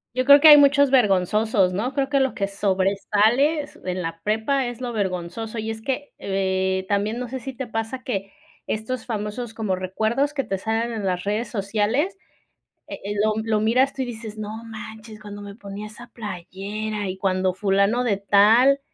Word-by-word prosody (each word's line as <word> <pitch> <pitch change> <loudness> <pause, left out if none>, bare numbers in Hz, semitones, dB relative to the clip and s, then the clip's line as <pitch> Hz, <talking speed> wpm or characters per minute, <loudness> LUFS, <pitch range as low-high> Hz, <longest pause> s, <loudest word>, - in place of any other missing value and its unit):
Yo 255 0 0
creo 280 +1 +9
que 315 - +7
hay 300 -1 +11
muchos 285 -1 +5
vergonzosos, 210 -3 +3
¿no?, 245 +8 -2
creo 275 -1 +1
que 280 0 +1
lo 265 -1 +1
que 195 - -1
sobresales 205 +9 +1
en 180 0 -3
la 165 0 -5
prepa 220 +7 0
es 240 -1 -6
lo 245 -2 -4
vergonzoso. 195 +3 -3
Y 220 0 -3
es 220 0 -7
que, 275 +3 -4
eh, 190 -1 -1
también 205 +3 0
no 250 - -4
sé 260 +2 -5
sí 265 +2 -7
te 260 +1 -5
pasa 225 +2 -4
que 195 -2 -3 0.4
estos 220 +4 -3
famosos 225 +1 -4
como 210 -4 -1
recuerdos 220 +10 -1
que 275 - 0
te 195 - -3
salen 225 +3 -1
en 215 - -4
las 180 -2 -1
redes 210 +4 -1
sociales, 220 - 0 0.7
eh - - -6
eh, 205 - -3
lo 215 - +3
lo 220 -1 0
miras 250 +5 +2
tú, 265 - -3
y - - -1
dices: 220 -3 -7
"No 210 -1 -5 0.2
manches, 220 0 -9
cuando 205 -1 -9
me 200 -1 -9
ponía 205 -1 -8
esa 235 +3 -12
playera 205 +1 -5
y 185 - -4
cuando 185 -1 0
fulano 200 +5 +2
de 205 -5 +1
tal." 220 +8 +5
215 Hz, 190 wpm, -23 LUFS, 200-245 Hz, 0.7 s, hay